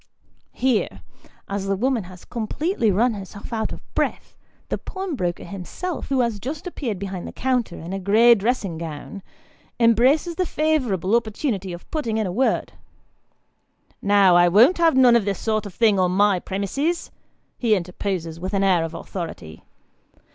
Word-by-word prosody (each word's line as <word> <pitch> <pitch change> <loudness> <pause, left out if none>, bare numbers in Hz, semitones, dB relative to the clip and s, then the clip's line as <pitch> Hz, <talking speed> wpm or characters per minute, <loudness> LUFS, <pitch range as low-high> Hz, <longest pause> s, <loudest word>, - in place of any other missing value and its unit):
Here, 250 -4 0 0.4
as 200 0 -3
the 195 - +1
woman 240 0 0
has 180 0 -13
completely 240 - -1
run 225 +5 +2
herself 200 +2 -9
out 220 -1 -1
of - - -8
breath, - - -2 0.3
the - - -2
pawnbroker 295 - -4
him 185 +1 -7
self, 360 - -5
who 270 -2 +2
has 230 -4 -1
just 290 - -5
appeared 260 - -4
behind 190 -2 -5
the - - -6
counter 250 -8 -1
in 170 +3 -7
a 195 - -2
grey 220 +5 +6
dressing 205 -6 -1
gown, 165 +4 -7 0.6
embraces 255 - +3
the 365 - +1
favourable 250 - +1
opportunity 215 -4 -1
of 175 0 -9
putting 235 -9 -1
in 220 - 0
a 185 - -2
word: 255 +8 0 0.7
" - - -42
Now 190 -3 +6
I 175 0 +6
won't 235 - +5
have 330 -5 +4
none 250 -2 +7
of 235 - +4
this 200 -2 -1
sort 215 -1 -1
of 195 - -11
thing 215 -4 +3
on 180 -1 +3
my 195 0 +3
premises! 275 - -2 0.2
" - - -45
he 225 -4 +3
interposes 180 -2 -4
with 185 +3 -3
an 195 - +2
air 185 -4 +3
of 165 0 -5
authority. 165 - -7
210 Hz, 170 wpm, -23 LUFS, 185-250 Hz, 0.7 s, none